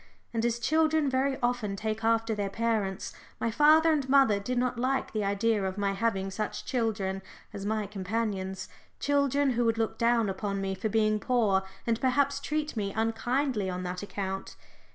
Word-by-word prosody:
And 225 -1 0
as 235 0 +1
children 310 +2 +2
very 265 +1 +1
often 240 -5 0
take 215 +2 -3
after 225 0 +2
their 205 -2 -2
parents, 215 -3 -1 0.3
my 230 - 0
father 310 +6 +5
and 285 -4 0
mother 265 -7 +5
did 250 +5 -3
not 245 -1 0
like 265 +2 0
the 215 -1 0
idea 200 +1 +1
of 190 0 -3
my 200 -1 +1
having 195 -1 -1
such 210 +2 -4
children 210 -6 -1 0.3
as 200 0 -5
my 215 -1 0
companions 195 -1 -3 0.3
children 280 -1 +2
who 240 0 +1
would 225 0 +2
look 225 -1 -1
down 235 -1 +3
upon 195 +1 -2
me 195 0 -2
for 190 +3 -2
being 215 0 +2
poor, 215 -6 +2 0.2
and 230 -1 0
perhaps 280 +1 +2
treat 300 0 -2
me 200 -3 -2
unkindly 225 0 0
on 180 0 -4
that 180 0 -4
account. 195 -1 -5
225 Hz, 175 wpm, -29 LUFS, 200-255 Hz, 0.3 s, father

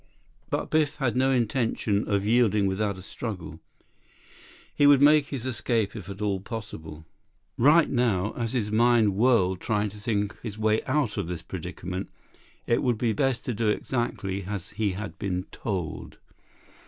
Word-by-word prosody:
But - - -2
Biff 155 -1 +2
had 130 -6 -1
no 130 +1 +3
intention 115 -4 0
of 100 -1 0
yielding 110 -3 +3
without 100 +1 -1
a 95 - -10
struggle. 90 -8 -6 1.1
He 145 - +4
would 145 -2 +7
make 145 0 +6
his 130 -5 -5
escape 115 -4 -1
if 100 -4 -8
at 100 +2 -6
all 100 -2 0
possible. 95 -8 -8 0.5
Right 150 +7 +5
now, 110 -6 +1
though, - - -7
as 115 0 -2
his 105 -5 -1
mind 115 -2 +4
whirled 95 -5 +3
trying 105 -2 0
to 105 - -12
think 105 -2 -1
his 110 -3 -6
way 110 0 +1
out 135 -5 0
of - - -2
this 85 -2 -5
predicament, 90 +4 -6 0.6
it 115 - +2
would 120 -3 +1
be 115 -1 +1
best 130 +3 0
to 125 - -1
do 110 +1 -1
exactly 105 -4 -2
as 100 -2 -5
he 105 -2 -1
had 100 +1 -7
been 90 -2 -2
told. 95 -7 -4
110 Hz, 165 wpm, -26 LUFS, 100-120 Hz, 1.1 s, would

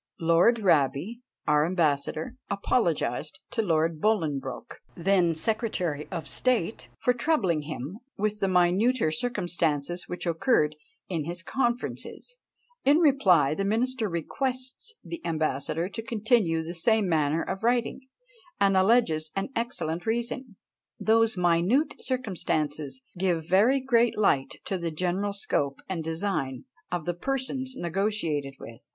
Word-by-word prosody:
Lord 170 +8 +4
Raby, 170 - +1 0.2
our 150 -1 +4
ambassador, 170 - 0
apologised 165 - 0
to 225 - 0
Lord 165 -4 +1
Bolingbroke, 150 - -1 0.2
then 175 -2 +3
secretary 180 -7 -1
of 170 -3 -4
state, 230 -6 0
for 250 - +2
troubling 235 - +1
him 155 - -5 0.2
with 210 +1 -1
the 195 - +1
minuter 185 +3 +3
circumstances 175 - -1
which 180 - -5
occurred 165 - +2 0.3
in 165 -5 -2
his 170 +1 -5
conferences; 250 - -3 0.5
in 285 +2 +5
reply, 200 - +4
the 195 - -2
minister 225 +2 0
requests 255 - -3
the 335 -1 -7
ambassador 155 +1 -1
to 225 - -5
continue 215 -7 +1
the 165 +2 -6
same 215 +4 +2
manner 155 -1 +1
of 195 - -4
writing, 240 +1 +1 0.6
and 195 -1 +4
alleges 185 -6 +3
an 195 +5 -2
excellent 175 -8 -2
reason: 235 0 -2 0.4
"Those 225 -1 +3
minute 180 - +2
circumstances 155 - -2 0.2
give 175 -4 0
very 215 +10 +4
great 240 -3 +2
light 140 -10 +2
to 190 - -2
the 170 -1 -2
general 180 +5 -1
scope 140 -8 -1
and 175 -4 -3
design 160 - -2 0.3
of 175 -3 -2
the 175 - 0
persons 260 +5 -3
negotiated 170 - -1
with. 115 0 -11
185 Hz, 125 wpm, -27 LUFS, 160-230 Hz, 0.6 s, in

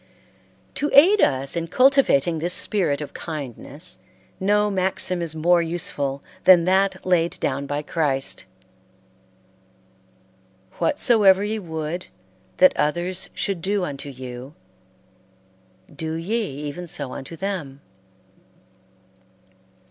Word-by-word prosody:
To 295 - -1
aid 380 +9 +7
us 135 +2 +1
in 165 0 -2
cultivating 255 - +3
this 175 +3 +2
spirit 165 -9 +1
of 150 - -7
kindness, 150 +1 -6 0.4
no 210 +2 +2
maxim 185 -1 -1
is 165 -2 -2
more 170 +2 +3
useful 145 -5 -3 0.2
than 175 -3 +7
that 190 +1 +1
laid 175 -2 +1
down 140 0 -2
by 145 +1 -3
Christ: 145 -4 -2 2.3
"Whatsoever 215 -10 +4
ye 215 +1 -2
would 160 -1 -5 0.5
that 275 - +6
others 175 +5 -1
should 195 -4 -2
do 195 +2 0
unto 145 -3 -5
you, 130 +2 -9 1.4
do 160 +2 -4
ye 170 +7 -2
even 150 +3 -6
so 140 -5 -5
unto 135 +5 -8
them." 165 -7 -5
170 Hz, 105 wpm, -23 LUFS, 145-190 Hz, 2.3 s, aid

